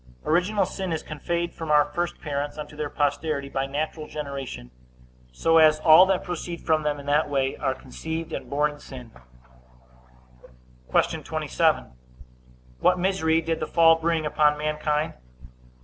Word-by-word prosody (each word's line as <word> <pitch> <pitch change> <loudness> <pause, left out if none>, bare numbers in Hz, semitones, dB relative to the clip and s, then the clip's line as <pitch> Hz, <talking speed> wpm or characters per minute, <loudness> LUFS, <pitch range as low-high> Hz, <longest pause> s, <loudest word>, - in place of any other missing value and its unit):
Original 185 +5 +2
sin 190 0 -5
is 160 - -2
conveyed 170 +3 -3
from 160 -1 -7
our 150 -1 +5
first 170 +4 -3
parents 145 -1 -3
unto 150 0 -8
their 150 -1 -3
posterity 145 -1 -1
by 135 0 -2
natural 150 +2 -4
generation, 140 - -6 0.6
so 165 - +3
as 155 -1 +5
all 160 +4 +8
that 190 -1 +1
proceed 175 -1 -5
from 160 -1 +2
them 150 -1 -2
in 140 - -10
that 145 +2 +2
way 135 -1 0
are 135 -2 -1
conceived 160 +5 -6
and - - -5
born 150 +1 +1
in 145 - -13
sin. 125 -5 -11 1.8
Q. - - +1
27. - - 0 0.9
What - - +3
misery 175 -3 +1
did 165 0 -2
the - - -3
fall 165 -1 +5
bring 165 -1 0
upon 150 0 +2
mankind? 150 0 -1
155 Hz, 150 wpm, -25 LUFS, 145-165 Hz, 1.8 s, all